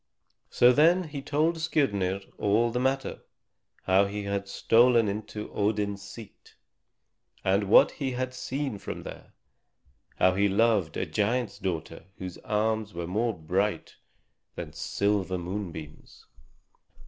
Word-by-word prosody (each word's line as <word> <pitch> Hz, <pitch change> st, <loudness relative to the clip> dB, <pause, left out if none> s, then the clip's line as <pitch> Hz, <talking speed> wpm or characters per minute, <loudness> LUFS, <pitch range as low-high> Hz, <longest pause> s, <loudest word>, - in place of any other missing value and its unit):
So 125 Hz, -, +5 dB
then 170 Hz, +6 st, +4 dB
he 145 Hz, -2 st, -5 dB
told 155 Hz, +4 st, 0 dB
Skirnir 100 Hz, -, 0 dB, 0.2 s
all 110 Hz, +3 st, +2 dB
the 125 Hz, -, -1 dB
matter: 135 Hz, +1 st, -1 dB, 0.6 s
how 95 Hz, +1 st, +4 dB
he 100 Hz, +1 st, -4 dB
had 100 Hz, 0 st, -3 dB
stolen 115 Hz, +3 st, +4 dB
into 105 Hz, +1 st, -5 dB
Odin's 105 Hz, -1 st, -1 dB
seat, 105 Hz, +1 st, -12 dB, 0.9 s
and 100 Hz, +2 st, +2 dB
what -, -, +7 dB
he 135 Hz, -3 st, -3 dB
had 130 Hz, +1 st, -3 dB
seen 130 Hz, -3 st, -4 dB
from -, -, -6 dB
there; -, -, -11 dB, 0.8 s
how 95 Hz, -, +4 dB
he 100 Hz, +2 st, +2 dB
loved 100 Hz, -5 st, +2 dB
a -, -, -1 dB
giant's 105 Hz, +5 st, -1 dB
daughter 80 Hz, -4 st, -4 dB
whose 90 Hz, -2 st, -7 dB
arms 110 Hz, -1 st, -1 dB
were 85 Hz, 0 st, -3 dB
more 110 Hz, +4 st, -1 dB
bright 95 Hz, +6 st, -2 dB, 0.6 s
than -, -, -7 dB
silver 100 Hz, -2 st, -1 dB
moonbeams. 85 Hz, -4 st, -7 dB
105 Hz, 125 wpm, -27 LUFS, 95-120 Hz, 0.9 s, what